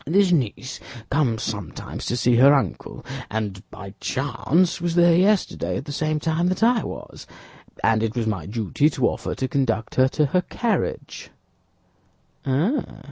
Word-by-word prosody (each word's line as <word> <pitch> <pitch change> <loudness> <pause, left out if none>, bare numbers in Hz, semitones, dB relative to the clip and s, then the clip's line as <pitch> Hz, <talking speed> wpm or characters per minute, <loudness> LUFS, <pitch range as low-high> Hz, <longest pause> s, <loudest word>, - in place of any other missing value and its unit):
"This 190 +3 +3
niece 130 - -1 0.3
comes 130 -6 +1
sometimes 100 -8 -5
to 120 - -1
see 120 0 +3
her 140 +4 +7
uncle; 135 - -3 0.2
and 105 -3 -3
by 100 -1 -10
chance 165 +6 0
was 170 -1 -1
there 175 -1 +6
yesterday 195 +3 +1
at 135 - -6
the 145 - -6
same 155 +1 -1
time 165 +3 0
that 185 +4 0
I 235 0 +4
was, - - -8 0.6
and 110 -1 +3
it 115 0 -1
was 120 -2 -1
my 95 -8 -2
duty 115 - +1
to 130 -5 +1
offer - - -3
to 130 - -2
conduct 115 -5 -1
her 130 0 +4
to 150 +3 +1
her 180 - +4
carriage." 220 +1 -3
135 Hz, 155 wpm, -23 LUFS, 115-170 Hz, 0.6 s, her